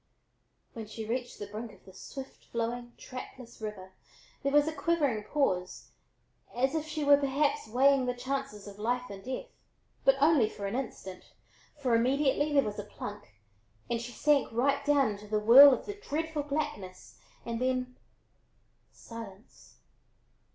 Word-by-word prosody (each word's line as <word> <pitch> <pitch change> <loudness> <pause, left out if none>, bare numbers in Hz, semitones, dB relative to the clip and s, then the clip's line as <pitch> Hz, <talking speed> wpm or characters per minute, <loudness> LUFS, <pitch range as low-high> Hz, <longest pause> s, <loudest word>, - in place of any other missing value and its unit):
When 225 -2 -7
she 220 +1 -7
reached 245 +2 -3
the 205 - -6
brink 215 +3 -7
of - - -20
the 190 - -14
swift 265 +7 -10
flowing, 240 +1 -4
trackless 250 -2 -10
water, 205 -3 -6 0.5
there 275 - 0
was 295 +1 +4
a 315 - -1
quivering 285 -8 0
pause, 185 -11 -1 0.6
as 265 +3 +1
if 315 -1 -2
she 305 -1 -3
were 285 0 +7
perhaps 285 +9 0
weighing 265 +2 +3
the 250 - -1
chances 265 -4 -4
of 205 0 -11
life 245 +2 -1
and 195 -1 -9
death; 260 - -4 0.6
but 270 - +5
only 285 -6 +4
for 200 - -7
an 195 - -3
instant, 195 -8 -6 0.5
for 260 -5 0
immediately 275 +5 +2
there 280 -1 +4
was 210 0 -4
a - - -3
plunk 205 - -9 0.6
and 235 -1 0
she 240 +1 -7
sank 290 +2 +2
right 275 +5 +1
down 280 -5 +4
into 205 0 -9
the 215 +1 0
whirl 255 +7 +10
of 250 - -1
the 410 - -4
dreadful 320 -5 -3
blackness 205 - -5 0.3
and 235 0 -3
then 255 0 -1 1.0
silence. 225 -2 -12
250 Hz, 160 wpm, -30 LUFS, 215-280 Hz, 1.0 s, whirl